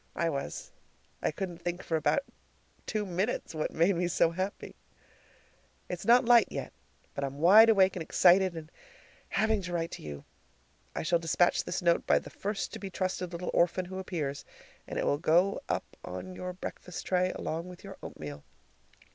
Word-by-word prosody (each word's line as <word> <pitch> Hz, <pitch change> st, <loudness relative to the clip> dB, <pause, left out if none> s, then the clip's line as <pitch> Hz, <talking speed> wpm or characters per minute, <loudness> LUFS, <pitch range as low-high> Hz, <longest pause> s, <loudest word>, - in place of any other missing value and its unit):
I 170 Hz, -1 st, 0 dB
was! 140 Hz, -2 st, -5 dB, 0.5 s
I -, -, +1 dB
couldn't 175 Hz, +1 st, -5 dB
think 175 Hz, +1 st, -3 dB
for 165 Hz, -, -1 dB
about 160 Hz, -, +2 dB, 0.6 s
two 215 Hz, -2 st, -1 dB
minutes 190 Hz, +3 st, -2 dB
what 155 Hz, -1 st, -1 dB
made 170 Hz, +4 st, +3 dB
me 175 Hz, +1 st, 0 dB
so 165 Hz, -1 st, +3 dB
happy. 185 Hz, +4 st, -4 dB, 1.1 s
It's 180 Hz, -1 st, -5 dB
not 245 Hz, +2 st, +6 dB
light 240 Hz, 0 st, +6 dB
yet, -, -, -5 dB, 0.4 s
but 140 Hz, -, -4 dB
I'm 135 Hz, 0 st, -4 dB
wide 205 Hz, +9 st, +8 dB
awake 195 Hz, -3 st, +5 dB
and 180 Hz, -, -4 dB
excited 180 Hz, +2 st, +4 dB
and 160 Hz, 0 st, -8 dB, 0.6 s
having 220 Hz, -1 st, +1 dB
to 180 Hz, -1 st, -6 dB
write 165 Hz, -1 st, -1 dB
to -, -, -7 dB
you. 75 Hz, -2 st, -8 dB, 0.7 s
I -, -, -2 dB
shall 170 Hz, +1 st, +2 dB
despatch 170 Hz, +2 st, +2 dB
this -, -, -3 dB
note 170 Hz, -1 st, +2 dB
by -, -, +5 dB
the -, -, -5 dB
first 205 Hz, 0 st, -3 dB
to -, -, -6 dB
be 195 Hz, -, -6 dB
trusted 185 Hz, -1 st, -2 dB
little 175 Hz, +1 st, -4 dB
orphan 180 Hz, +1 st, +2 dB
who 185 Hz, +1 st, -6 dB
appears, 155 Hz, -7 st, -3 dB, 0.4 s
and -, -, -5 dB
it -, -, 0 dB
will 145 Hz, -, +1 dB
go 175 Hz, -, +3 dB
up -, -, -3 dB
on 185 Hz, -, -6 dB
your 180 Hz, 0 st, -5 dB
breakfast 180 Hz, -1 st, -7 dB
tray 185 Hz, 0 st, +2 dB
along 165 Hz, +2 st, -4 dB
with 180 Hz, 0 st, -12 dB
your 195 Hz, -1 st, -9 dB
oatmeal. 75 Hz, -2 st, -8 dB
180 Hz, 180 wpm, -30 LUFS, 165-190 Hz, 1.1 s, wide